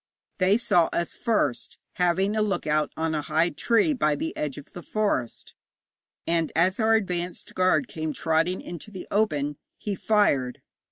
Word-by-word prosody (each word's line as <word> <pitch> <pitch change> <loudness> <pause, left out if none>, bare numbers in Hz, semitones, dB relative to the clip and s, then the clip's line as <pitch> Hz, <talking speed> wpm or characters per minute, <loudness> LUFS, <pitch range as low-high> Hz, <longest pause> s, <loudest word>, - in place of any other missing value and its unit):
They 190 +3 +4
saw 175 -8 +3
us 170 - -2
first, 215 - -1 0.2
having 185 +4 +2
a 215 - +2
look 200 -4 -1
out 150 0 +1
on 160 0 -1
a 150 - 0
high 160 +4 +1
tree 230 - +2
by 150 - +1
the 160 - -4
edge 145 -3 -3
of 145 - -11
the 175 - -7
forest; 200 - -2 0.7
and 165 -1 0
as 185 +6 +2
our 225 0 +4
advanced 180 -4 -3
guard 185 +8 +2
came 160 -5 -4
trotting 165 +4 0
into 175 +4 -8
the 190 -3 -9
open, 150 -9 0 0.2
he 205 - -3
fired. 185 - +1
175 Hz, 165 wpm, -26 LUFS, 155-205 Hz, 0.7 s, They